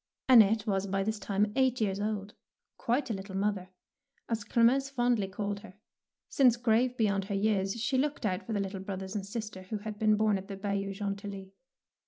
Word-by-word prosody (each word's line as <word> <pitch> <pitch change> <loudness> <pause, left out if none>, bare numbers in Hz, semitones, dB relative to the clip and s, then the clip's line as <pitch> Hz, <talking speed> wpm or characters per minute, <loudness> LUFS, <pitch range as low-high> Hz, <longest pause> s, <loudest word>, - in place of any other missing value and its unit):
Annette 220 -4 +6
was 195 -2 0
by 195 0 0
this 215 +1 -2
time 205 +1 0
eight 260 -1 +2
years 200 -3 0
old, 210 -1 -3 0.4
quite 245 +1 -1
a - - 0
little 195 -1 -6
mother, 195 -2 -1 0.6
as 225 -2 -2
Clemence 250 +5 +3
fondly 240 -6 +1
called 200 +1 -3
her, 200 -3 -13 0.5
since, 250 -4 +4
grave 240 +1 +2
beyond 200 -3 +1
her 200 0 -3
years, 195 +1 0
she 260 +4 +1
looked 285 -3 -1
out 185 -3 0
for 225 - -3
the 205 - 0
little 195 0 -3
brothers 190 0 -5
and 205 -2 -2
sister 210 -3 -5
who 190 +4 -5
had 210 0 -7
been 215 -1 +4
born 210 -2 +2
at 190 - -11
the 195 - -6
Bayou 200 0 -2
Gentilly. 200 -1 -5
205 Hz, 195 wpm, -30 LUFS, 195-230 Hz, 0.6 s, Annette